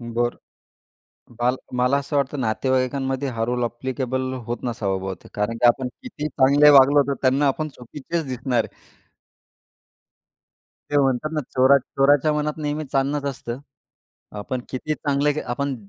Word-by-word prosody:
बरं. 120 Hz, 0 st, -2 dB, 1.1 s
मला 125 Hz, +2 st, +2 dB, 0.2 s
मला 125 Hz, +3 st, +3 dB
असं 140 Hz, +1 st, -4 dB
वाटतं 140 Hz, 0 st, 0 dB
नातेवाईकांमध्ये 130 Hz, +3 st, 0 dB
हा 115 Hz, -, -1 dB
रोल 125 Hz, 0 st, -1 dB
ॲप्लिकेबल 130 Hz, +2 st, -3 dB
होत 120 Hz, 0 st, -3 dB
नसावा 110 Hz, -6 st, -1 dB
बहुतेक, 95 Hz, 0 st, -7 dB
कारण 105 Hz, +3 st, -1 dB
की 120 Hz, -, +2 dB
आपण 130 Hz, +1 st, +2 dB, 0.2 s
किती 150 Hz, -12 st, -5 dB
चांगले 145 Hz, +1 st, +5 dB
वागलो, 140 Hz, 0 st, +7 dB
तर 140 Hz, -, +1 dB
त्यांना 135 Hz, +2 st, +3 dB
आपण 155 Hz, +3 st, -1 dB
चुकीचेच 150 Hz, +6 st, -5 dB
दिसणार 125 Hz, -2 st, 0 dB
आहे. -, -, -17 dB, 1.9 s
ते 145 Hz, -, +1 dB
म्हणतात 135 Hz, +2 st, +1 dB
ना 155 Hz, -, 0 dB
चोरा 130 Hz, +2 st, +6 dB
"चोराच्या 140 Hz, +3 st, +2 dB
मनात 150 Hz, 0 st, -1 dB
नेहमी 150 Hz, +1 st, -2 dB
चांदनच 140 Hz, +1 st, -1 dB
असतं." 120 Hz, -2 st, -6 dB, 0.8 s
आपण 125 Hz, +5 st, -4 dB
कितीही 155 Hz, +4 st, -3 dB
चांगले 145 Hz, 0 st, +1 dB
आपण 135 Hz, +3 st, -2 dB
130 Hz, 140 wpm, -23 LUFS, 125-145 Hz, 1.9 s, वागलो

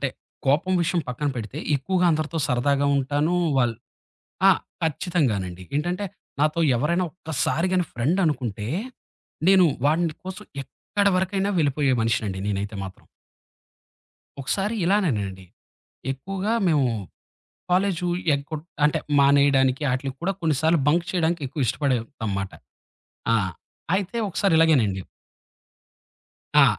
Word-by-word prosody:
అంటే -, -, +1 dB, 0.4 s
కోపం 150 Hz, +7 st, +2 dB
విషయం 170 Hz, +1 st, +1 dB
పక్కన 145 Hz, +4 st, -2 dB
పెడితే, 115 Hz, +5 st, -5 dB, 0.2 s
ఎక్కువగా 180 Hz, +6 st, +1 dB
అందరితో 155 Hz, +1 st, -1 dB
సరదాగా 140 Hz, +3 st, +2 dB
ఉంటాను. 145 Hz, +5 st, 0 dB, 0.2 s
వాళ్ళ్ 120 Hz, -3 st, +2 dB, 0.7 s
ఆ! -, -, +9 dB, 0.3 s
ఖచ్చితంగానండి. 125 Hz, -, -1 dB
ఏంటంటే 175 Hz, +7 st, -1 dB, 0.3 s
నాతో 155 Hz, +3 st, +2 dB, 0.2 s
ఎవరైనా 170 Hz, +9 st, +1 dB
ఒక్కసారి 165 Hz, +1 st, -1 dB
గాని 180 Hz, -1 st, +2 dB
ఫ్రెండ్ 140 Hz, +11 st, +1 dB
అనుకుంటే, 120 Hz, -8 st, -2 dB, 0.8 s
నేను 190 Hz, -2 st, +7 dB, 0.2 s
వాడిని 160 Hz, +2 st, +2 dB
కోసం 190 Hz, +3 st, -7 dB, 0.2 s
ఎక్కడ 200 Hz, +9 st, -3 dB
వరకైనా 190 Hz, +1 st, 0 dB
వెళ్ళిపోయే 140 Hz, -2 st, +2 dB
మనిషినండి 110 Hz, -4 st, 0 dB
నేనైతే 100 Hz, +1 st, -2 dB
మాత్రం. 95 Hz, -1 st, -10 dB, 1.4 s
ఒకసారి 195 Hz, +10 st, -1 dB
ఇలానేనండి, 110 Hz, -, 0 dB, 0.7 s
ఎక్కువగా 195 Hz, +10 st, -3 dB, 0.2 s
మేము 145 Hz, -5 st, +3 dB, 0.8 s
కాలేజు 180 Hz, -1 st, +1 dB, 0.3 s
ఎగ్గొట్ 150 Hz, +2 st, -5 dB, 0.2 s
అంటే 150 Hz, -, +3 dB, 0.2 s
మానేయడానికి 140 Hz, -1 st, +4 dB
ఆటిలకి 130 Hz, +1 st, -3 dB
కూడా 195 Hz, +3 st, +1 dB
కొన్నిసార్లు 160 Hz, +1 st, +2 dB
బంక్ 170 Hz, +3 st, +3 dB
చేయడానికి 170 Hz, -2 st, 0 dB
ఎక్కువ 135 Hz, +1 st, -2 dB
ఇష్టపడేవాళ్ళంమాట. 115 Hz, -7 st, -2 dB, 0.8 s
ఆ! -, -, +5 dB, 0.6 s
అయితే 195 Hz, +4 st, -2 dB
ఒకసారి 195 Hz, 0 st, +1 dB
ఇలాగేనండి. 120 Hz, -13 st, +3 dB, 1.6 s
ఆ! -, -, +8 dB
150 Hz, 110 wpm, -24 LUFS, 125-175 Hz, 1.6 s, ఆ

